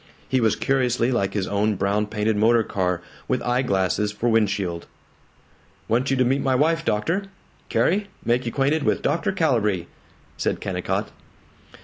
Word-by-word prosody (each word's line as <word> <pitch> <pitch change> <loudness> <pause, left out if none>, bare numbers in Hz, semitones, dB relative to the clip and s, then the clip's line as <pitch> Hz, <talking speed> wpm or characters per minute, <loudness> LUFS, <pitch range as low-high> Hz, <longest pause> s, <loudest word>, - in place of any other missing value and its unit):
He 130 -1 +1
was 110 -2 +3
curiously 125 +1 +1
like 105 -6 0
his 100 -3 0
own 105 +1 +1
brown 100 +2 0
painted 105 +1 0
motor 115 +2 +4
car, 90 -4 -1 0.2
with 130 - +1
eye 125 +1 +1
glasses 100 -2 0
for 120 +3 -1
windshield. 100 -6 0 1.0
"Want 125 +4 +1
you 135 - +1
to 130 - +3
meet 135 +3 +1
my 130 -1 +1
wife, 165 +5 +2
doctor 165 - 0 0.4
Carrie, 200 +4 +1 0.2
make 120 +1 +1
you - - -1
'quainted 140 +5 +1
with - - 0
Dr. 160 +6 +1
Calibree," 115 - +1 0.5
said - - -1
Kennicott. - - -2
115 Hz, 155 wpm, -23 LUFS, 105-135 Hz, 1.0 s, motor